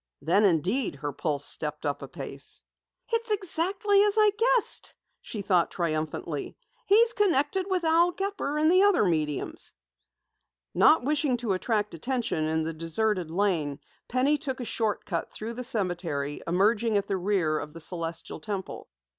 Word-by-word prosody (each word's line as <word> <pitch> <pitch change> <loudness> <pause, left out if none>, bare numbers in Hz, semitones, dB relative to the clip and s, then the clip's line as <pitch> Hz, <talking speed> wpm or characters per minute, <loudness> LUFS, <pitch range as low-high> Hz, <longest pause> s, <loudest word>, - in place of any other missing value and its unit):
Then, 195 +7 +3
indeed, 190 - +1
her 145 +1 -4
pulse 145 -2 -1
stepped 150 0 -2
up 145 0 -2
a - - -6
pace. - - -6 0.5
"It's 460 0 0
exactly 395 +1 +2
as 415 0 +3
I 425 -1 +6
guessed!" 470 +1 +1 0.3
she 210 -3 -6
thought 180 -3 +2
triumphantly. 155 -2 -3 0.3
"He's 455 +3 +5
connected 370 -2 +1
with 370 -2 0
Al 330 +2 +4
Gepper 385 -6 -3
and 310 +2 +4
the 370 +1 +6
other 400 - +4
mediums!" 155 -5 -2 1.0
Not 315 - +5
wishing 290 -2 +1
to 230 -4 -1
attract 210 +2 -1
attention 235 - -1
in 160 0 0
the 165 +1 -3
deserted 170 +3 -1
lane, 165 -6 0 0.3
Penny 270 +4 +2
took 265 -3 -4
a 245 - -4
short 220 -2 -1
cut 170 -4 -3
through 225 +2 -6
the 250 +2 -5
cemetery, 175 - -2
emerging 210 +5 +2
at 200 - 0
the 195 - -1
rear 180 -5 +1
of 150 - -7
the 165 - -9
Celestial 165 -1 -5
Temple. 190 +3 -6
210 Hz, 155 wpm, -27 LUFS, -, 1.0 s, I